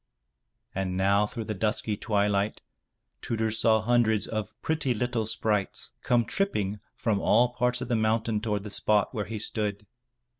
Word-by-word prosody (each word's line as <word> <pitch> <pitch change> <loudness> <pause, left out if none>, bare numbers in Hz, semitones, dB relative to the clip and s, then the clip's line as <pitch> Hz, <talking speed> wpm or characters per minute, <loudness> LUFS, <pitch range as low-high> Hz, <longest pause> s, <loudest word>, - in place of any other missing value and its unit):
And 95 -1 -2
now 100 +2 +3
through 115 +1 -5
the 110 - -3
dusky 105 +1 -1
twilight, 100 -1 0 0.6
Tudur 110 -1 -1
saw 110 0 +3
hundreds 110 -2 +3
of 110 -1 -4
pretty 155 -6 0
little 115 -1 -1
sprites 105 -2 -1
come 120 -2 +2
tripping 105 - -1 0.2
from 110 -4 0
all 120 +5 +4
parts 125 0 0
of 125 - -3
the 120 - +1
mountain 110 0 +1
toward 105 -3 -1
the 105 - -7
spot 105 +2 +2
where 105 -4 -2
he 110 +3 -5
stood. 105 -1 -2
110 Hz, 155 wpm, -28 LUFS, 105-115 Hz, 0.6 s, all